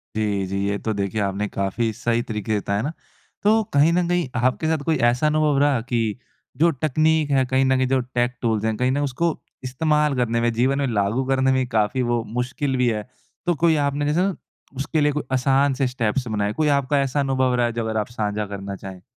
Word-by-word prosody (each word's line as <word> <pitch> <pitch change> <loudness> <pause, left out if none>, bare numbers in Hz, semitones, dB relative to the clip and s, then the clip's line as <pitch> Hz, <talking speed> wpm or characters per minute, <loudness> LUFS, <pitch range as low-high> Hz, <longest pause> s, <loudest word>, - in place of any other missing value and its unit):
जी, 105 -3 0
जी। 100 +1 -3
ये 100 0 0
तो 110 - -2
देखिए, 100 +1 -2
आपने 100 +1 -1
काफ़ी 100 +4 -1
सही 120 +1 0
तरीके 110 -3 -2
बताया 100 +1 -1
ना। 145 - -2 0.5
तो 220 +2 +4
कहीं 145 +3 +5
न 175 -1 +1
कहीं 175 -3 0
आपके 130 +5 +1
साथ 160 -2 0
कोई 160 -1 +2
ऐसा 120 +4 +2
अनुभव 150 -1 +2
रहा 145 -3 +3
कि 120 -1 -1 0.6
जो 170 +3 +4
तकनीक 155 +2 +1
है, 135 -1 +3
कहीं 130 +1 +2
न 130 0 +3
कहीं 130 0 +1
जो 135 0 +2
टेक 125 0 -1
टूल्स 110 -2 0
हैं, 110 -1 0
कहीं 125 +2 +1
न 135 - 0
उसको 165 +6 0 0.3
इस्तेमाल 150 +3 +1
करने 115 -2 0
में, 120 0 +2
जीवन 130 +4 +1
में 140 - 0
लागू 110 +3 0
करने 130 0 +3
में 130 - +2
ही 130 - 0
काफ़ी 110 +3 0
वो 120 -1 0
मुश्किल 130 +2 -1
भी 125 -1 +2
है। 105 -1 -3 0.4
तो 175 -1 +2
कोई 165 -2 +5
आपने 145 +1 -1
जैसे 150 +4 +1
ना, 195 -1 0 0.4
उसके 140 +4 -1
लिए 150 0 +3
कोई 150 +1 -3
असान 135 +2 +2
से 130 0 0
स्टेप्स 125 0 -1
बनाए, 105 -1 -1
कोई 155 +4 0
आपका 140 +1 +1
ऐसा 135 +1 -1
अनुभव 130 -2 +1
रहा 120 -1 +2
है, 120 - -2
जो 115 - -2
अगर 110 0 -2
आप 105 -1 -1
साझा 105 0 -1
करना 100 -1 -6
चाहें? 95 -1 -10
130 Hz, 230 wpm, -22 LUFS, 110-145 Hz, 0.6 s, कहीं